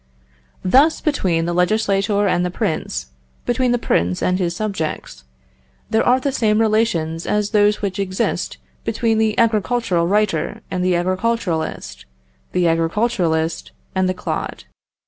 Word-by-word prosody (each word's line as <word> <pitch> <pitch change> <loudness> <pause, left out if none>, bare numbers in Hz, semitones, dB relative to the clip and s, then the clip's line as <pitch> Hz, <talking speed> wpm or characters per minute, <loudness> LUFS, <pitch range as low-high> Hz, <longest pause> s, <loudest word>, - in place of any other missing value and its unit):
Thus, 275 - +4
between 185 - 0
the 175 - -1
legislator 200 +2 +1
and 180 -1 +1
the 180 - 0
prince, 160 - -3 0.3
between 250 0 +1
the 245 - +3
prince 90 - 0
and 185 +1 +1
his 175 -2 -1
subjects, 165 - -4 0.7
there 220 - +3
are 250 +1 +4
the 275 +2 -1
same 215 -4 +2
relations 210 -8 +1
as 210 0 0
those 210 -1 +3
which 195 0 -2
exist 190 -1 -2 0.3
between 225 0 0
the 220 -1 +1
agricultural 225 -5 +1
writer 190 -5 0
and 180 -1 -1
the 185 -1 +2
agriculturist, 185 -2 -2 0.5
the 180 -1 +2
agriculturist 165 -1 0 0.2
and 190 -1 +1
the 185 - -1
clod. - - -4
195 Hz, 135 wpm, -20 LUFS, 175-220 Hz, 0.7 s, Thus